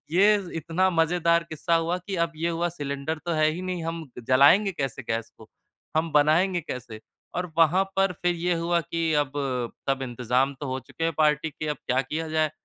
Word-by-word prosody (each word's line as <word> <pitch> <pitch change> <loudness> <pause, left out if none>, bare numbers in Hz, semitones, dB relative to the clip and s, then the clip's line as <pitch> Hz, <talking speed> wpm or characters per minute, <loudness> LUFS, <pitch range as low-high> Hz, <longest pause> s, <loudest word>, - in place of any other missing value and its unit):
ये 200 +5 +5 0.2
इतना 170 +4 +1
मज़ेदार 170 0 +2
किस्सा 165 +2 0
हुआ 165 +2 +1
कि 195 -2 -3
अब 165 - -7
ये 165 +2 -1
हुआ 170 +1 0
सिलेंडर 145 0 -4
तो 170 - 0
है 155 -1 +3
ही 175 +4 -5
नहीं 180 -2 -3
हम 165 0 -4 0.2
जलाएँगे 145 +10 +6
कैसे 135 -7 -4
गैस 115 0 -2
को? - - -14 0.5
हम 160 0 +1
बनाएँगे 165 +5 +3
कैसे? 125 -7 -7 0.3
और 180 -1 -3
वहाँ 170 +4 +5
पर 195 -1 +3
फ़िर 175 +1 -1
ये 175 +1 0
हुआ 170 +1 +1
कि 165 -1 -2
अब 135 -1 -9 0.6
सब 135 0 0
इंतज़ाम 125 +2 0
तो 145 - -4
हो 130 0 -2
चुके 165 +6 -6
हैं 165 - +1
पार्टी 150 0 +2
के 155 +1 -6
अब 150 - -1
क्या 130 +1 +2
किया 160 +4 -4
जाए? 155 -1 +1
165 Hz, 200 wpm, -26 LUFS, 145-175 Hz, 0.6 s, जलाएँगे